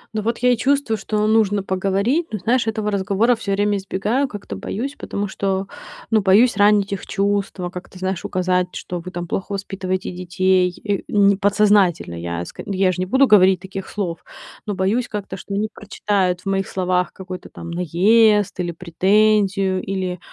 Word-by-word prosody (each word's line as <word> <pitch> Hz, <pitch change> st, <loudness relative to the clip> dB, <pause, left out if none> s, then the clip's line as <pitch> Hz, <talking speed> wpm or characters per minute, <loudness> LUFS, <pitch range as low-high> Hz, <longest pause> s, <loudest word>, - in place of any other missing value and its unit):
Ну, 215 Hz, -, 0 dB
вот 230 Hz, +2 st, -1 dB
я 250 Hz, +1 st, +3 dB
и -, -, -1 dB
чувствую, 265 Hz, -2 st, +1 dB
что 210 Hz, +1 st, -1 dB
нужно 210 Hz, -2 st, +2 dB
поговорить. 195 Hz, -, 0 dB
Но 215 Hz, -, -2 dB
знаешь, 230 Hz, +5 st, +1 dB
этого 215 Hz, -1 st, -1 dB
разговора 205 Hz, +4 st, +2 dB
всё 205 Hz, -3 st, -3 dB
время 205 Hz, +1 st, +1 dB
избегаю, 205 Hz, +8 st, -1 dB
как-то 205 Hz, -, -7 dB
боюсь, 230 Hz, -, -4 dB
потому 205 Hz, 0 st, -4 dB
что, 195 Hz, 0 st, -2 dB, 0.5 s
ну, 220 Hz, -1 st, +4 dB
боюсь 205 Hz, +6 st, +4 dB
ранить 205 Hz, -1 st, +3 dB
их 195 Hz, -, -6 dB
чувства, 200 Hz, -2 st, -1 dB
как-то, 180 Hz, +1 st, -10 dB
знаешь, 185 Hz, -1 st, -3 dB
указать, 180 Hz, 0 st, 0 dB
что 180 Hz, -, -5 dB
вы 175 Hz, +2 st, -8 dB
там 175 Hz, -1 st, -5 dB
плохо 195 Hz, +4 st, -3 dB
воспитываете 190 Hz, -1 st, -3 dB
детей, 180 Hz, 0 st, +1 dB
э, 200 Hz, -2 st, +1 dB
м. 200 Hz, -1 st, +4 dB
Подсознательно, 200 Hz, -, +3 dB
я 85 Hz, 0 st, -4 dB
ск -, -, -13 dB
я 190 Hz, -1 st, +1 dB
ж 180 Hz, -, -5 dB
не 185 Hz, -, -1 dB
буду 265 Hz, +7 st, +4 dB
говорить 190 Hz, -4 st, +5 dB
таких 190 Hz, +1 st, -7 dB
слов. 175 Hz, -5 st, -4 dB, 0.4 s
Но 205 Hz, -, -2 dB
боюсь 205 Hz, +6 st, 0 dB
как-то, 205 Hz, -2 st, -5 dB
что 200 Hz, +2 st, -6 dB
они 210 Hz, +2 st, 0 dB
прочитают 195 Hz, -3 st, -1 dB
в -, -, -26 dB
моих 195 Hz, 0 st, 0 dB
словах 180 Hz, -1 st, 0 dB
какой-то 185 Hz, -1 st, -9 dB
там 170 Hz, -, -9 dB
наезд 205 Hz, +5 st, +3 dB
или 175 Hz, -1 st, -1 dB
претензию, 190 Hz, +2 st, +2 dB
или, 185 Hz, -2 st, -3 dB
195 Hz, 175 wpm, -20 LUFS, 185-210 Hz, 0.5 s, говорить